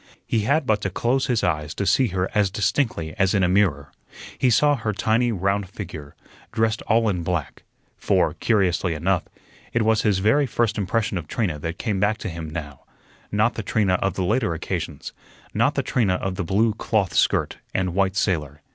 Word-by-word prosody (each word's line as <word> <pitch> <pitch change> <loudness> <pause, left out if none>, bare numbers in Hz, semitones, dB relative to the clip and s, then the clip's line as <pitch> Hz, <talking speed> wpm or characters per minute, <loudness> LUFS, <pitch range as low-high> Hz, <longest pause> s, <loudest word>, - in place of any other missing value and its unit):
He 115 - 0
had 140 +8 +1
but 110 -3 +1
to 100 - -1
close 120 +8 0
his 120 -5 0
eyes 75 -4 -1
to 100 - -2
see 130 +5 +3
her 95 -2 -1
as 105 -2 +2
distinctly 100 - -1
as 95 +1 +3
in 95 - +3
a - - +4
mirror. 85 -7 +1 0.4
He 130 - +2
saw 145 +5 +4
her 110 -4 -2
tiny, 115 +4 +1
round 100 -1 -1
figure, 80 -8 -8 0.4
dressed 110 -1 0
all 115 0 +3
in 90 -4 0
black 85 -3 -3 0.4
for, - - +1
curiously 95 -6 +1
enough, 90 +3 0 0.5
it 115 - +2
was 110 0 +3
his 105 -4 +2
very 110 +9 +3
first 115 -2 0
impression 100 0 -1
of 80 - -9
Trina 90 -6 -2
that 80 +3 -4
came 105 -5 -2
back 105 +2 +2
to 110 - -5
him 80 -2 -6
now 75 -4 -6 0.5
not 105 +3 +2
the - - -4
Trina 105 -2 +1
of 95 -2 0
the 95 - -1
later 105 -3 +1
occasions, - - -5 0.4
not - - +2
the - - 0
Trina 100 -7 +1
of 95 +1 -2
the 100 +2 -3
blue 105 +6 +2
cloth 105 -3 0
skirt - - +1
and 95 -2 -1
white 95 0 +1
sailor. 75 -7 -1
100 Hz, 195 wpm, -23 LUFS, 90-110 Hz, 0.5 s, a